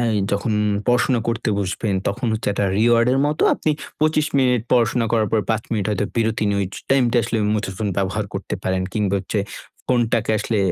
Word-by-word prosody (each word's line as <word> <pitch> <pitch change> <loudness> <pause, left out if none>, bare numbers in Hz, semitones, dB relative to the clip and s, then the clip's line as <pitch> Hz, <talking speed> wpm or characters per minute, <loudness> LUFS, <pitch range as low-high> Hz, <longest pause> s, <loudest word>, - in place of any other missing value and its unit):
এ - - +1 0.3
যখন 100 +3 0 0.3
পড়াশোনা 125 0 +2
করতে 115 0 -1
বসবেন 100 +1 -2
তখন 120 +5 -3
হচ্ছে 110 -1 -2
একটা 100 - 0
reward 115 +2 +4
এর 135 - +2
মতো 150 +1 -1
আপনি 155 - -1 0.3
২৫ 155 -1 +2
মিনিট 125 -3 +2
পড়াশোনা 115 -1 +2
করার 110 -3 +2
পর 110 - +3
৫ 110 0 0
মিনিট 105 -4 0
হয়তো 105 0 0
বিরতি 115 -1 0
নিয়ে 100 - 0
ঐ - - 0 0.3
টাইমটা 125 -3 +3
আসলে, 115 +1 -1 0.2
মুঠোফোন 105 0 -2
ব্যবহার 100 +2 -1
করতে 95 - -4
পারেন 95 0 0
কিংবা 105 -3 0
হচ্ছে 100 +2 -2 0.5
ফোনটাকে 115 -2 +1
আসলে 110 +1 -1
110 Hz, 185 wpm, -21 LUFS, 105-120 Hz, 0.5 s, reward